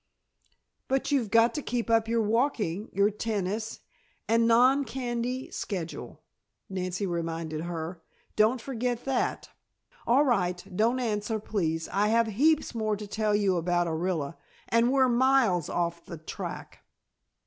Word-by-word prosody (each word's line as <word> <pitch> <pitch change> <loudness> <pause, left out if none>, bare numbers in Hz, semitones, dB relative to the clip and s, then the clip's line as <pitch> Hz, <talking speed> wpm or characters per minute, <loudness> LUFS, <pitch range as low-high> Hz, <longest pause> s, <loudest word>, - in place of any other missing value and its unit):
"But 270 +2 0
you've 255 -7 +1
got 230 +2 +4
to 300 - -3
keep 240 -3 -2
up 225 -1 +3
your 230 0 +1
walking, 215 - 0
your 200 +2 +2
tennis 210 0 -3 0.5
and 230 0 +3
non 255 +5 +5
candy 250 0 -3
schedule," 175 -5 -5 0.4
Nancy 185 +1 -3
reminded 165 -3 -3
her. 165 0 -5 0.3
"Don't 220 +4 +3
forget 245 -1 -3
that. 270 -2 -1 0.6
All 270 +5 +5
right, 180 -8 +1
don't 230 +6 +2
answer, 220 -2 -1
please, 165 -7 -2
I 205 +2 +1
have 230 +1 +3
heaps 285 +9 +2
more 215 -2 0
to 210 - -7
tell 210 0 0
you 200 -3 +2
about 175 +1 +1
Orilla 165 -2 -2 0.3
and 230 +2 +3
we're 265 -1 +4
miles 245 - +3
off 170 -1 -2
the 170 - -8
track." 155 - -7
215 Hz, 135 wpm, -28 LUFS, 180-240 Hz, 0.6 s, non